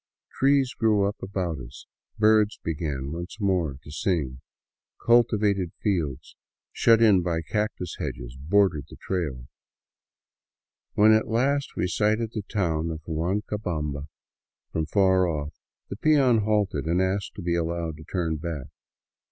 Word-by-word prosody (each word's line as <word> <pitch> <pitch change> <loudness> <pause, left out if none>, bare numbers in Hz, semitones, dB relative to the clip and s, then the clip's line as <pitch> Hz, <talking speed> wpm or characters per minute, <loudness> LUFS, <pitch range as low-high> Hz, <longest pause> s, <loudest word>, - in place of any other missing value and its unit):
Trees 135 -1 +3
grew 105 -3 +2
up 100 - -5
about 90 -5 -3
us, 65 +2 -11 0.3
birds 110 -1 +4
began 75 -4 -3
once 85 +6 -6
more 90 -9 0
to 75 - -11
sing, 75 -7 -1 0.6
cultivated 105 -6 +3
fields 80 -10 -2 0.4
shut 115 0 +4
in 100 -5 +6
by 85 -2 -1
cactus 105 -3 -3
hedges - - -5
bordered 75 0 +1
the - - -11
trail. 75 -10 -3 1.5
When 105 +1 +6
at 110 - +2
last 135 +5 0
we - - 0
sighted 110 +4 +1
the 110 - -2
town 85 -6 -1
of 80 -1 -6
Huancabamba 80 -4 -2 0.6
from 80 -1 -1
far 95 -2 +3
off, 75 -3 -3 0.4
the 100 - -4
peon 135 -5 +4
halted 100 -8 0
and 85 +2 +2
asked 95 +1 -1
to 100 - -7
be 85 0 0
allowed 85 -1 -2
to 80 - -11
turn 80 -3 -2
back. 75 -4 -5
90 Hz, 135 wpm, -26 LUFS, 80-105 Hz, 1.5 s, in